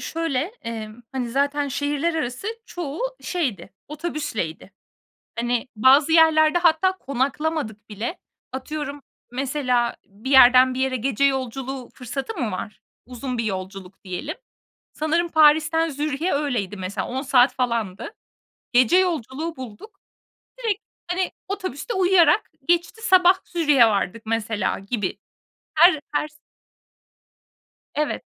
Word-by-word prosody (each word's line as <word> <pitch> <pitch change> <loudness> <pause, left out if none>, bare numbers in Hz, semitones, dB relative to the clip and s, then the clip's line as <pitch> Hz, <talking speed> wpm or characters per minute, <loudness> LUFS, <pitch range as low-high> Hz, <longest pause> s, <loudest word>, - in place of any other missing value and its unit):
Şöyle, 325 -6 -2 0.2
emm, 225 0 -6
hani, 250 -3 -3
zaten 285 +2 0
şehirler 290 +4 -1
arası 260 - -3 0.2
çoğu 320 -3 -6 0.2
şeydi, 265 - -3 0.2
otobüsleydi. 290 - -4 0.7
Hani, 240 +1 -1
bazı 270 +7 +5
yerlerde 320 0 +5
hatta 340 +2 +4
konaklamadık 275 - -2
bile. 220 - -5 0.3
Atıyorum 285 +2 -5 0.3
mesela 250 -2 0
bir 210 +7 -7
yerden 255 -1 +7
bir 255 - -4
yere 265 0 +1
gece 260 +2 -1
yolculuğu 265 -1 -1
fırsatı 265 - -5
mı 230 -4 -1
var? 195 +3 -6 0.2
Uzun 250 0 -5
bir 230 - 0
yolculuk 190 -2 -6
diyelim. 185 -2 -5 0.6
Sanırım 325 +3 0
Paris'ten 315 +1 +4
Zürih'e 300 +3 -2
öyleydi 245 -9 -1
mesela. 185 +1 -4
10 260 +2 -3
saat 260 -2 +4
falandı. 235 - -2 0.6
Gece 255 +8 +5
yolculuğu 325 -3 -1
bulduk. 260 - -10 0.6
Direkt, 440 -5 -1 0.3
hani, 365 +1 0 0.2
otobüste 375 - -4
uyuyarak 370 0 +4 0.2
geçti, 345 +6 +1
sabah 370 -3 +6
Zürih'e 295 -8 +4
vardık 210 +1 -1
mesela 220 -2 -1
gibi. 200 0 -3 0.6
Her 325 -1 +7
her 300 - 0
s 305 - -22 1.6
Evet. 300 0 -1
275 Hz, 115 wpm, -23 LUFS, 235-315 Hz, 1.6 s, yerden